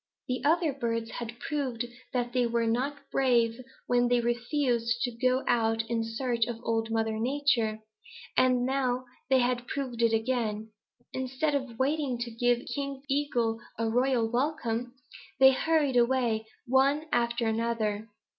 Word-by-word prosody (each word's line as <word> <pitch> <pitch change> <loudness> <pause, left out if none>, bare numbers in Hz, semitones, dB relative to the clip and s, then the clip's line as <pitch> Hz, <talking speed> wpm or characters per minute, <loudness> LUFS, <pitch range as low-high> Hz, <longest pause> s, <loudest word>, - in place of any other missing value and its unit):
The 250 0 -2
other 320 0 +3
birds 230 -3 -2
had 235 0 -6
proved 260 -6 -2 0.3
that 245 -1 -1
they 250 -2 +2
were 235 0 0
not 255 +6 0
brave 240 -2 +2 0.2
when 245 0 +3
they 245 - +3
had 240 - +1
refused 240 -1 0
to 245 - 0
go 255 +2 +1
out 225 -1 +2
in 230 -1 +1
search 230 0 -1
of 235 -2 -4
Old 225 0 0
Mother 225 -1 0
Nature, 240 -4 +1 0.5
and 255 -1 +3
now 255 -1 0 0.2
they 260 -2 +4 0.2
proved 255 -4 -3
it 230 -1 +4
again. 220 -2 -1 0.4
Instead 260 +4 -1
of 260 -5 -2
waiting 275 -1 0
to 240 0 -4
give 245 +1 +1
King 275 -1 -4
Eagle 250 -5 0 0.2
a 230 0 0
royal 245 -1 +2
welcome, 245 -1 -1 0.4
they 265 0 +9
hurried 290 -1 +2
away, 235 -3 +2 0.2
one 275 +4 +3
after 235 0 +1
another. 220 -1 -1
245 Hz, 145 wpm, -29 LUFS, 230-265 Hz, 0.5 s, they